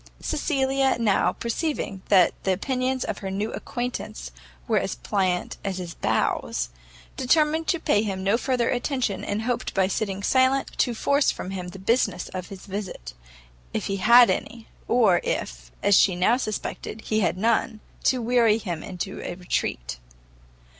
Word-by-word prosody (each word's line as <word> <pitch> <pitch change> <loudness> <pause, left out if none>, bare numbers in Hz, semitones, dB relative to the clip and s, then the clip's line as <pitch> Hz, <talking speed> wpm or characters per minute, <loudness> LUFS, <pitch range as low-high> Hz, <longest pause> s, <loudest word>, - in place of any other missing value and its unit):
Cecilia 270 -3 +1
now 210 -4 +3
perceiving 235 - -3
that 185 -4 +5
the 190 - +1
opinions 255 +6 -1
of - - -4
her 195 - -5
new 205 +3 -2
acquaintance 240 - -5 0.4
were - - +3
as - - -3
pliant 180 - -1
as 195 -2 -2
his 175 -2 -5
bows, - - -1 0.5
determined 310 +4 +2
to 345 - +1
pay 205 - +2
him 195 -3 -3
no 200 +3 +3
further 250 -1 0
attention, 245 -4 -1
and 205 +2 -2
hoped 245 0 -2
by 190 -1 +4
sitting 195 0 -2
silent 260 +3 +2
to 240 -3 +2
force 280 +5 +2
from 185 - -4
him 185 -2 -5
the 180 - -9
business 230 +7 0
of 185 -2 -6
his 195 -2 -10
visit, 195 - -6 0.6
if - - -1
any - - 0
he - - -3
had, 235 +2 +4 0.2
or 225 -7 +4
if, - - -4
as 200 - +5
she 185 -2 +5
now 185 +7 +3
suspected, 215 -2 -4
he 215 0 0
had 185 -3 +1
none, 220 +1 +1 0.2
to 255 -2 +2
weary 230 -2 +4
him 175 -8 -4
into 190 +1 -5
a 175 - -5
retreat. 65 - -3
215 Hz, 160 wpm, -25 LUFS, 190-250 Hz, 0.6 s, that